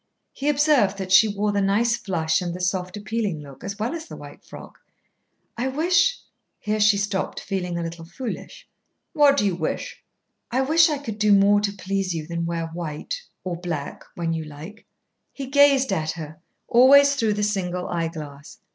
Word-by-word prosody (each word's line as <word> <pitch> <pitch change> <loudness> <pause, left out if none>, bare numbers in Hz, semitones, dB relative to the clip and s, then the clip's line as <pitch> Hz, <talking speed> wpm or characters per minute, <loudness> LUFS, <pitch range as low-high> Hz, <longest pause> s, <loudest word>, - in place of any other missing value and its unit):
He 285 +2 -2
observed 285 -9 +3
that 190 -1 -5
she 190 +3 +7
wore 205 0 -1
the 200 0 0
nice 215 +5 +2
flush 170 -8 -1
and 175 -1 -4
the - - -7
soft 180 +1 -2
appealing 210 -5 -3
look, 140 -2 -13
as 200 +1 -5
well 220 +6 -2
as 335 -1 -6
the - - -9
white - - -12
frock. - - -12 0.8
"I 245 +3 -2
wish 340 - +2 0.2
" - - -52
Here 215 0 -2
she 210 -1 +4
stopped, 200 -1 -2
feeling 180 -3 -3
a 170 - -2
little 165 0 -7
foolish. 255 - -7 0.5
"What 290 -3 +5
do 205 - +2
you 195 - +1
wish?" 160 -2 -4 0.5
"I 255 +2 +1
wish 320 +5 +4
I 300 - -1
could 225 -7 -7
do 210 0 +3
more 200 +1 +5
to 205 -1 0
please 195 -2 -3
you 155 -2 -4
than 170 0 -3
wear 165 -1 -2
white 165 - -5 0.2
or 180 -2 -3
black 165 -5 -5
when 165 -1 -2
you 160 -1 -3
like." 155 +8 -11 0.5
He 275 - -6
gazed 275 -3 +4
at 155 -4 -1
her, 155 -1 -9 0.3
always 280 +4 +6
through 225 -6 +1
the 210 0 -2
single 180 -3 -2
eyeglass. 160 -4 -5
200 Hz, 190 wpm, -23 LUFS, 170-245 Hz, 0.8 s, she